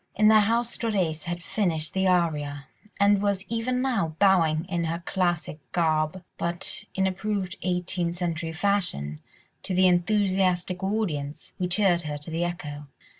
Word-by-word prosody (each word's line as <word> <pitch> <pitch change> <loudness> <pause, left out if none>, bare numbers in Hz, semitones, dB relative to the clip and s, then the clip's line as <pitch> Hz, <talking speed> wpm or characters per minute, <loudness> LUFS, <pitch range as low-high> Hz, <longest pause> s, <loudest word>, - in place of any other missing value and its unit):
In 215 +1 +5
the 220 0 +7
house 230 +3 +1
Storace 185 -9 -1
had 175 0 -4
finished 165 -8 -1
the 190 0 +1
aria, 150 -6 0 0.3
and 200 0 +4
was 200 -1 0
even 250 +3 0
now 195 -12 0
bowing 165 -5 +3
in 175 -3 -1
her 165 +1 -3
classic 175 -5 -1
garb, 160 +1 +1 0.2
but 170 0 -2
in 190 - +2
approved 190 -1 -2
eighteenth 180 -1 -1
century 170 -2 -2
fashion, 165 - 0 0.4
to 190 - -3
the 185 0 +5
enthusiastic 185 0 +1
audience, 170 -9 -2
who 180 - 0
cheered 180 -1 +3
her 150 -2 -4
to 145 +3 -7
the 165 +2 -1
echo. 150 -4 -5
180 Hz, 150 wpm, -26 LUFS, 160-200 Hz, 0.4 s, the